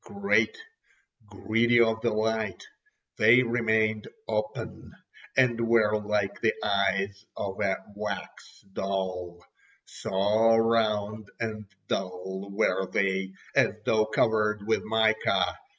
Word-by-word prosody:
Great, 200 - +1 0.7
greedy 115 +4 +2
of 115 -1 +3
the 120 - +1
light, 110 -2 -1 0.6
they 115 +4 +6
remained 110 -2 +1 0.2
open, 110 0 -4 0.5
and 120 -3 +3
were 115 -2 +3
like 105 -1 -1
the - - +2
eyes 100 0 0
of 100 0 -4
a 100 -2 +1 0.2
wax 105 +1 -7
doll—so 95 +3 -1
round 110 -2 +1
and 110 -2 -4 0.2
dull 95 +2 -4
were 95 -1 0
they, 95 0 0 0.2
as - - +3
though 110 -1 +2
covered 105 -1 +1
with 110 - +1
mica. 110 0 +1
105 Hz, 105 wpm, -27 LUFS, 100-110 Hz, 0.7 s, they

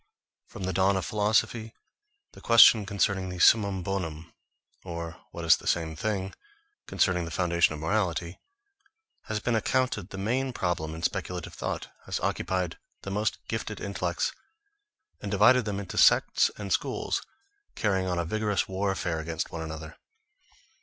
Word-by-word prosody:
From 95 - -9
the 95 0 -1
dawn 95 +2 +3
of 95 - -2
philosophy, 110 +2 0 0.6
the - - -15
question 115 -3 +7
concerning 100 -2 0
the 90 - -6
summum 100 0 +4
bonum, 80 -4 -4 0.5
or, 85 -2 -6
what 85 - -7
is 85 0 +7
the - - -10
same 80 -2 0
thing, 95 +1 -2 0.5
concerning 90 -3 +1
the - - -6
foundation 85 -2 +2
of - - -8
morality, 85 -1 -1 0.9
has 110 -1 -2
been 120 +3 -1
accounted 110 -3 0
the 95 - -8
main 125 +6 -1
problem 80 -6 -2
in 80 - -8
speculative 90 -2 -3
thought, - - -4 0.2
has - - -2
occupied 90 -2 -1 0.2
the 95 - -5
most 105 +2 -1
gifted - - -4
intellects, - - -2 0.9
and 100 - -5
divided 115 +5 +5
them 100 -2 -2
into 100 -2 -4
sects - - +5
and 100 -2 -2
schools, - - -1 0.5
carrying 95 -3 0
on 90 -1 -1
a 85 - 0
vigorous 105 +1 0
warfare 95 -3 -1
against 80 0 -4
one 85 - -5
another. 80 -1 -7
95 Hz, 150 wpm, -28 LUFS, 85-105 Hz, 0.9 s, question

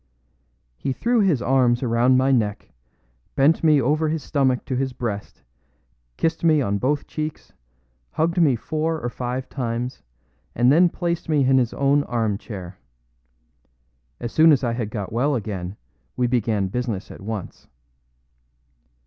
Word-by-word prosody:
He 135 - -2
threw 235 - +1
his 180 - +2
arms 125 -1 +2
around 120 +2 +3
my 130 +1 +3
neck, 110 -6 -1 0.6
bent 145 +5 +3
me 155 -3 +5
over 150 +5 +1
his 160 -1 -2
stomach 130 -4 0
to 130 - -3
his 130 0 -1
breast, 110 -5 -5 0.7
kissed 165 0 -1
me 160 -2 +4
on 100 -6 0
both 145 +5 0
cheeks, 155 -1 -6 0.6
hugged 170 +3 +1
me 145 -6 +4
four 155 +7 -2
or 120 - -3
five 125 +1 -4
times, 125 -1 -4 0.5
and 120 +2 +4
then 175 +4 +5
placed 170 -2 -3
me 145 -4 +3
in 130 0 +4
his 120 -2 0
own 140 +1 +3
arm 110 -4 -1
chair. 95 -4 -9 1.4
As 120 - -5
soon 160 +1 +6
as 140 -2 +3
I 120 -2 0
had 115 -3 -3
got 105 -2 -5
well 140 +5 +1
again, 100 -4 -5 0.4
we 125 - +2
began 115 -4 0
business 110 -3 -3
at - - -11
once. 105 -1 -6
130 Hz, 150 wpm, -23 LUFS, 115-150 Hz, 1.4 s, soon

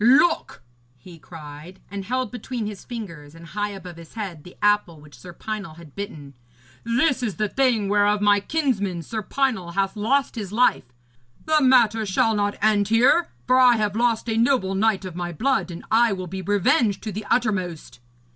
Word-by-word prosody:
'Look!' 290 - +3 0.3
he 165 +7 -14
cried, 155 +3 -11
and 200 -1 -5
held 255 +3 -2
between 245 -2 -5
his 205 -2 -7
fingers 170 - -8
and 165 0 -12
high 205 +6 -3
above 185 -4 -9
his 165 +4 -14
head 190 -9 -6
the 180 - -14
apple 205 -6 +1
which 145 0 -15
Sir 125 +9 -11
Pinel 195 -2 -6
had 160 -4 -14
bitten, 150 -9 -7 0.5
'this 250 +4 +1
is 220 -6 -2
the 215 -1 0
thing 240 -3 +1
whereof 205 +1 +2
my 205 0 +4
kinsman, 200 - -1
Sir 220 +7 -4
Pinel, 220 -7 -1
hath 195 0 0
lost 260 +7 +1
his 205 -5 -6
life. 235 - +2 0.6
The 310 -1 +3
matter 235 -5 +4
shall 210 +4 +2
not 205 -1 -1
end 210 -2 +3
here, 250 +10 +4 0.2
for 255 +1 +4
I 250 -2 +6
have 210 -2 -1
lost 235 0 +1
a 225 -1 -1
noble 230 -5 +2
knight 200 0 +1
of 180 -2 -7
my 175 0 -4
blood, 215 - 0
and 170 -1 -8
I 230 -1 +4
will 185 -1 -5
be 190 +2 -6
revenged 205 +2 +1
to 215 - -4
the 210 +2 -6
uttermost.' 185 - -1
205 Hz, 185 wpm, -23 LUFS, 180-235 Hz, 0.6 s, I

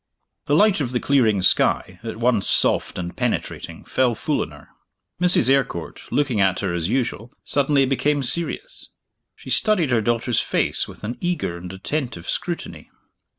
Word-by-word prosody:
The 145 - +3
light 205 0 +4
of 125 -3 -3
the 125 - +1
clearing 115 -9 +2
sky, 90 0 +2
at 110 -1 -5
once 115 -3 +1
soft - - +2
and 90 -1 -5
penetrating, - - -3
fell 125 -3 +1
full - - -1
on - - -3
her. - - -15 0.5
Mrs. 180 -8 +4
Eyrecourt, 135 -11 -1
looking 135 -8 +1
at 95 -1 +2
her 95 -3 -1
as 85 0 -1
usual, 125 -2 -2
suddenly 140 -1 +2
became 140 +2 0
serious: 170 - -5 0.5
she - - -10
studied 185 - +3
her 120 -2 +3
daughter's 120 +1 +1
face - - 0
with - - -13
an 120 +3 -5
eager 175 - -2
and 90 +1 -8
attentive 115 - -4
scrutiny. - - -4
125 Hz, 160 wpm, -22 LUFS, 100-145 Hz, 0.5 s, light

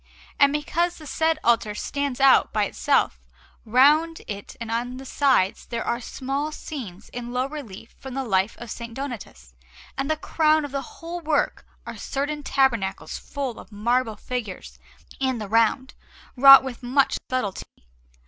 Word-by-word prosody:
And 280 0 +6
because 335 +4 -1
the 310 - -12
said 320 +2 +1
altar 225 -3 +2
stands 280 +2 -3
out 270 -1 +5
by 210 -1 +1
itself, 60 - +1 0.5
round 295 +8 +4
it 200 -1 -7
and 230 -1 -5
on 245 +2 -2
the 265 - -9
sides 260 -9 +1
there 235 - -3
are 235 +1 -1
small 275 +5 -3
scenes 225 - -8
in 240 0 -6
low 250 +1 0
relief 245 -8 -9
from 265 -1 -8
the 270 - -1
life 195 -2 +1
of - - -8
S. 235 0 -7
Donatus, 245 - -7 0.4
and 270 +2 -2
the 310 - +1
crown 310 0 +2
of 285 - -8
the 275 0 -2
whole 335 +6 -8
work 310 -3 -1 0.2
are - - -7
certain 290 +2 -3
tabernacles 245 -9 0
full 270 -5 -5
of - - -13
marble 225 +2 0
figures 230 -7 -6 0.4
in 260 -2 0
the 215 -2 -5
round, 230 +4 +2 0.4
wrought 275 +1 +10
with 265 -2 -7
much 260 +3 +2
subtlety. 255 -7 -2
260 Hz, 160 wpm, -24 LUFS, 230-285 Hz, 0.5 s, wrought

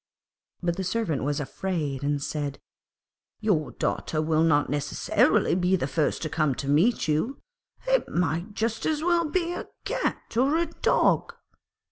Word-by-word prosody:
But 170 -1 0
the 190 - -2
Servant 185 - -1
was 145 +1 0
afraid, 150 -2 -3
and 145 0 0
said, 145 -2 -3 0.8
'Your 190 -9 +1
daughter 155 - -2
will 155 0 +2
not 155 -3 +3
necessarily 145 0 +2
be 180 +1 +2
the 170 - -1
first 150 +3 0
to - - -1
come 155 -4 +1
to 140 - -5
meet 165 +10 +3
you; 160 - 0 0.5
it - - +2
might 175 +4 -1
just 225 0 -1
as 310 -1 0
well 345 -1 +3
be 345 +1 0
a - - -5 0.2
cat - - -2
or 275 +6 +3
a 340 - +2
dog.' 330 - +1
170 Hz, 155 wpm, -26 LUFS, 150-230 Hz, 0.8 s, not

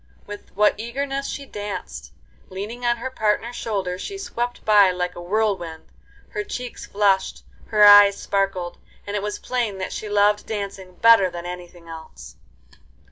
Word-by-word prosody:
With 205 0 -9
what 210 +1 +3
eagerness 275 +4 -3
she 280 - -5
danced! 195 - -7 0.4
leaning 210 +6 -7
on 240 0 +2
her 260 +3 -5
partner's 225 +1 -1
shoulder 190 -5 -3
she 395 - -6
swept 245 -11 -4
by 205 -3 +6
like 180 0 -3
a 175 - -8
whirlwind. 185 -4 -2 0.4
Her 420 - -3
cheeks 250 -12 -7
flushed, 200 -2 +1 0.2
her 210 -2 +3
eyes 205 -1 +8
sparkled, 195 -3 -2 0.3
and 205 - -4
it 205 - -1
was 210 0 -3
plain 235 -6 -2
that 185 - -4
she 215 - -5
loved 205 0 +2
dancing 195 -3 -6
better 225 -3 +6
than 175 0 -8
anything 175 -1 -9
else. 160 -1 -11
205 Hz, 155 wpm, -22 LUFS, 185-230 Hz, 0.4 s, eyes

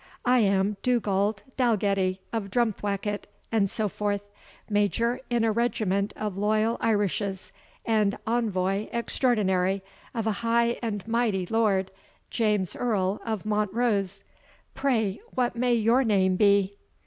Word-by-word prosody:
I 250 0 +4
am 200 -1 +2
Dugald 210 -4 +1
Dalgetty 200 -6 +1
of 215 -3 -2
Drumthwacket, 205 -2 -1 0.2
and 210 -4 +2
so 215 +1 -1
forth, 205 0 -2 0.5
Major 230 +4 +1
in 240 -2 +1
a 225 - +3
regiment 210 -3 0
of 210 -3 -4
loyal 215 +2 +1
Irishes, 205 -3 -1 0.3
and 215 -3 +2
Envoy 205 -4 0
Extraordinary 195 -6 +1 0.3
of 225 -2 -1
a 220 - +2
High 235 0 +2
and 210 -4 -3
Mighty 225 -5 +1
Lord, 195 -3 +1 0.4
James 210 -5 0
Earl 205 -5 0
of 220 -3 -3
Montrose. 210 -2 0 0.5
Pray, 225 - 0
what 245 -2 0
may 245 0 +2
your 230 +4 +3
name 190 -5 +2
be?" 200 0 +3
210 Hz, 125 wpm, -26 LUFS, 195-230 Hz, 0.5 s, I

